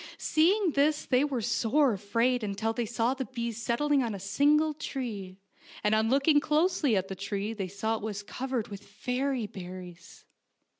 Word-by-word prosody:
Seeing 360 Hz, +4 st, +3 dB
this 295 Hz, +2 st, +2 dB
they 255 Hz, +1 st, +3 dB
were 265 Hz, -6 st, -1 dB
sore 255 Hz, +5 st, +2 dB
afraid 230 Hz, +5 st, +1 dB
until 210 Hz, +2 st, -1 dB
they 235 Hz, 0 st, -2 dB
saw 230 Hz, +3 st, +1 dB
the 265 Hz, -1 st, -4 dB
bees 235 Hz, -3 st, -4 dB
settling 280 Hz, +5 st, +2 dB
on 230 Hz, -4 st, -2 dB
a -, -, -7 dB
single 295 Hz, +10 st, +3 dB
tree, 215 Hz, -11 st, -5 dB, 0.5 s
and 210 Hz, -, +2 dB
on 220 Hz, +1 st, +3 dB
looking 280 Hz, +3 st, +4 dB
closely 305 Hz, -, +2 dB
at 190 Hz, 0 st, -1 dB
the 195 Hz, -, -5 dB
tree 200 Hz, +2 st, -3 dB
they 200 Hz, -4 st, -4 dB
saw 220 Hz, +4 st, -2 dB
it -, -, -10 dB
was 205 Hz, -1 st, -4 dB
covered 255 Hz, 0 st, -3 dB
with 200 Hz, -1 st, -8 dB
fairy 250 Hz, +4 st, -2 dB
berries. 180 Hz, -3 st, -10 dB
235 Hz, 170 wpm, -29 LUFS, 205-280 Hz, 0.5 s, looking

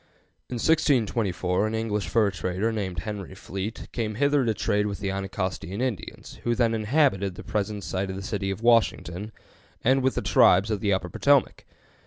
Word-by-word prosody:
In 125 Hz, -, -4 dB
1624 110 Hz, -, +1 dB
an 110 Hz, -, -3 dB
English 105 Hz, -2 st, -2 dB
fur 110 Hz, -3 st, +2 dB
trader 90 Hz, +5 st, -1 dB
named 95 Hz, -6 st, -3 dB
Henry 100 Hz, -2 st, -6 dB
Fleet 100 Hz, +3 st, -6 dB
came 110 Hz, -3 st, -3 dB
hither 140 Hz, +2 st, +2 dB
to 115 Hz, -, +2 dB
trade 105 Hz, -1 st, +1 dB
with 100 Hz, -1 st, -4 dB
the 100 Hz, -1 st, -2 dB
Anacostian 95 Hz, 0 st, -3 dB
Indians, 125 Hz, -7 st, -4 dB
who 120 Hz, 0 st, +1 dB
then 115 Hz, -2 st, +2 dB
inhabited 110 Hz, -, +1 dB
the -, -, -9 dB
present 105 Hz, -1 st, -2 dB
site 95 Hz, +1 st, -2 dB
of 95 Hz, -, -4 dB
the 95 Hz, -, -6 dB
city 95 Hz, 0 st, -2 dB
of 95 Hz, +3 st, -4 dB
Washington, 110 Hz, -4 st, +2 dB, 0.5 s
and 130 Hz, +2 st, +4 dB
with 130 Hz, 0 st, +1 dB
the -, -, -2 dB
tribes 95 Hz, +5 st, +5 dB
of 105 Hz, -, 0 dB
the 105 Hz, -1 st, 0 dB
Upper 95 Hz, -2 st, 0 dB
Potomac. 140 Hz, -, +2 dB
105 Hz, 180 wpm, -26 LUFS, 95-115 Hz, 0.5 s, tribes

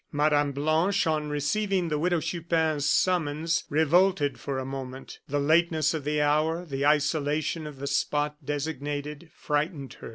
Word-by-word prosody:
Mme. 145 Hz, -1 st, +2 dB
Blanche, 155 Hz, +8 st, +1 dB
on 155 Hz, -2 st, 0 dB
receiving 175 Hz, +5 st, 0 dB
the 150 Hz, -1 st, -1 dB
Widow 175 Hz, 0 st, +1 dB
Chupin's 160 Hz, -4 st, 0 dB
summons, 165 Hz, -2 st, +1 dB
revolted 160 Hz, 0 st, +2 dB
for 140 Hz, -2 st, -4 dB
a 130 Hz, -, -3 dB
moment. 135 Hz, 0 st, -7 dB
The 145 Hz, +1 st, -1 dB
lateness 160 Hz, +1 st, +2 dB
of 155 Hz, -3 st, -4 dB
the 150 Hz, 0 st, 0 dB
hour, 155 Hz, +4 st, +1 dB
the 140 Hz, -3 st, -3 dB
isolation 150 Hz, +1 st, +1 dB
of 150 Hz, -2 st, -9 dB
the 140 Hz, -, -6 dB
spot 150 Hz, +1 st, 0 dB
designated, 145 Hz, +1 st, -4 dB
frightened 150 Hz, -2 st, -2 dB
her. -, -, -8 dB
150 Hz, 150 wpm, -27 LUFS, 145-165 Hz, -, Mme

